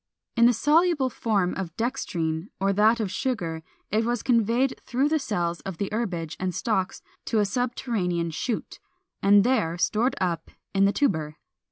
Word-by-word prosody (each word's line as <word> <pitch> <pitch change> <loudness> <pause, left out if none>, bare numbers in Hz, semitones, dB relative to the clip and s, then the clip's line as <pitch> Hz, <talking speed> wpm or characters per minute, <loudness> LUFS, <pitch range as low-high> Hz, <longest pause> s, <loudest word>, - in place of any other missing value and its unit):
In 235 0 +6
the - - +6
soluble 295 +1 +3
form 200 -7 0
of 180 -3 -5
dextrine, 175 -9 -2
or 195 +1 +2
that 215 +4 +4
of 205 -4 -2
sugar, 180 -12 -2 0.3
it 215 +3 +2
was 240 0 -1
conveyed 240 +2 +2
through 265 +4 0
the 315 0 +2
cells 175 -9 -2
of 190 -4 -7
the 200 - -2
herbage 180 -8 -2
and 185 -1 -2
stalks 215 -6 -1 0.2
to 225 - 0
a 210 - +4
subterranean 200 -7 -1
shoot, 225 +8 -4 0.4
and 200 0 +6
there 215 -10 +1
stored 225 +8 +1
up 170 -3 -1 0.2
in 195 0 +4
the 200 - +4
tuber. 160 - 0
210 Hz, 165 wpm, -26 LUFS, 180-240 Hz, 0.4 s, In